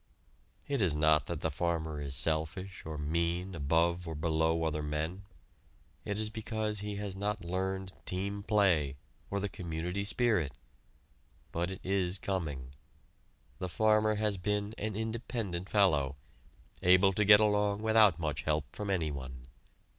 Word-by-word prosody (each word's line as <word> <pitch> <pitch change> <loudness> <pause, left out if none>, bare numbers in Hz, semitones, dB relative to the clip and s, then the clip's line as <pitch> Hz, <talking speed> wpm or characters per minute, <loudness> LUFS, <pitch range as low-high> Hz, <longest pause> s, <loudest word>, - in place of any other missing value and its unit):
It 140 -4 0
is 85 -6 +3
not 75 0 +3
that 85 -3 -4
the 80 - 0
farmer 80 -1 -2
is 70 -1 -4
selfish 80 +7 -1
or 80 -1 -4
mean 85 +5 -1
above 85 +3 +1
or 80 - -4
below 80 +1 +1
other 75 -1 -1
men. 80 +6 -3 0.8
It 105 - -2
is 110 0 -2
because 110 -1 -3
he 105 0 -4
has 100 -2 -4
not 100 0 -2
learned 95 +1 -2
team 100 +2 -1
play 95 -10 +2 0.3
or 100 - -1
the 100 - -1
community 90 +1 -4
spirit. 105 - +2 1.0
But 85 +2 -1
it 95 - -7
is 95 -1 +1
coming. 75 -10 -3 0.9
The 90 - -3
farmer 110 +2 +3
has 105 -1 +1
been 105 +2 -1
an 105 -1 -3
independent 110 -4 -3
fellow, 75 -10 +3 0.7
able 95 +2 +5
to 105 - +2
get 105 0 +8
along 105 -1 +2
without 110 -6 +5
much 80 -3 -2
help 75 -2 -1
from 105 -1 -4
anyone. 70 -8 -3
90 Hz, 145 wpm, -32 LUFS, 80-105 Hz, 1.0 s, get